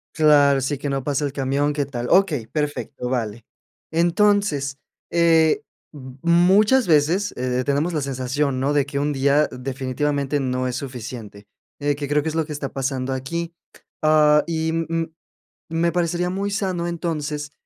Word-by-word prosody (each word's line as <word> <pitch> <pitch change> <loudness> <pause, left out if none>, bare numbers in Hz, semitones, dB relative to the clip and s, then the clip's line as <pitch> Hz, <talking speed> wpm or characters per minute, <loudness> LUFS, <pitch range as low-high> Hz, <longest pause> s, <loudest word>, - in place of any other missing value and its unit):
Claro, 145 -3 +5
sí, 140 +2 -1
que 145 +2 -4
no 135 -1 -2
pasa 145 +1 -1
el 140 - -3
camión, 140 +2 0
qué 145 -1 -1
tal 125 -3 -5
okey, 155 - +3
perfecto, 145 -2 -3
vale. 115 -3 -3 0.5
Entonces, 170 -4 +2 0.3
eh, 165 -2 +4 0.3
mm, 130 -4 -10
muchas 190 +8 +4
veces, 165 +6 +2
eh, 125 0 -1
tenemos 145 +5 +1
la 155 - -1
sensación, 135 0 -1
¿no?, 140 - +1
de 145 -2 +2
que 140 0 -5
un 145 +1 0
día, 140 +2 +2
definitivamente, 135 +2 -2
no 130 -1 -1
es 125 - -3
suficiente, 115 -6 -8 0.3
eh, 145 0 +1
que 145 -1 -4
creo 145 +1 +1
que 160 - -1
es 160 - -6
lo 160 -1 +1
que 150 - -6
está 140 -2 -4
pasando 135 -1 -2
aquí. 165 +6 -4 0.5
Ah, 150 -1 +5
y, 160 -1 -1
mm 165 0 -1
mm, 165 -1 -2 0.6
me 165 +1 +1
parecería 175 0 0
muy 195 +2 -2
sano, 185 -4 -1
entonces, 150 -4 -3
145 Hz, 165 wpm, -22 LUFS, 135-165 Hz, 0.6 s, Claro